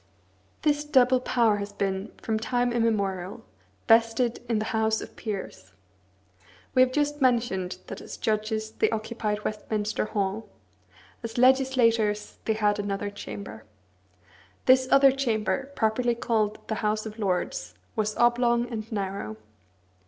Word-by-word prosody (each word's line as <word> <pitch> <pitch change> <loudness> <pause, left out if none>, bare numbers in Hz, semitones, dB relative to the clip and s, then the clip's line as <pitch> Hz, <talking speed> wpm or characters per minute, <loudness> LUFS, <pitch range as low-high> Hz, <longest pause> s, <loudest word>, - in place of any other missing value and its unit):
This 295 -1 +2
double 260 -3 +4
power 235 -4 +2
has 205 0 -5
been, 195 0 -2
from 220 -1 -1
time 245 +1 0
immemorial, 200 -5 -1 0.4
vested 230 +1 +3
in 230 - +2
the 215 - -1
House 220 0 +2
of - - -9
Peers. 195 - -6 1.0
We 255 - +5
have 255 0 +5
just 295 +1 0
mentioned 230 -8 +1
that - - -8
as - - -8
judges 220 0 -1
they - - +1
occupied 215 -1 -3
Westminster 215 0 -2
Hall; 205 0 -2 0.7
as 230 -1 -6
legislators, 240 -5 +3
they 220 - +2
had 210 -1 +1
another 205 0 -2
chamber. 105 - -8 1.0
This 260 0 +5
other 275 0 +7
chamber, 265 0 -1
properly 235 +2 +1
called 220 -3 -1
the 220 - -3
House 215 0 0
of 215 +1 -8
Lords, 200 - -2 0.2
was 215 -1 -1
oblong 240 0 +3
and 220 0 -5
narrow. 195 - -3
220 Hz, 130 wpm, -26 LUFS, 210-245 Hz, 1.0 s, other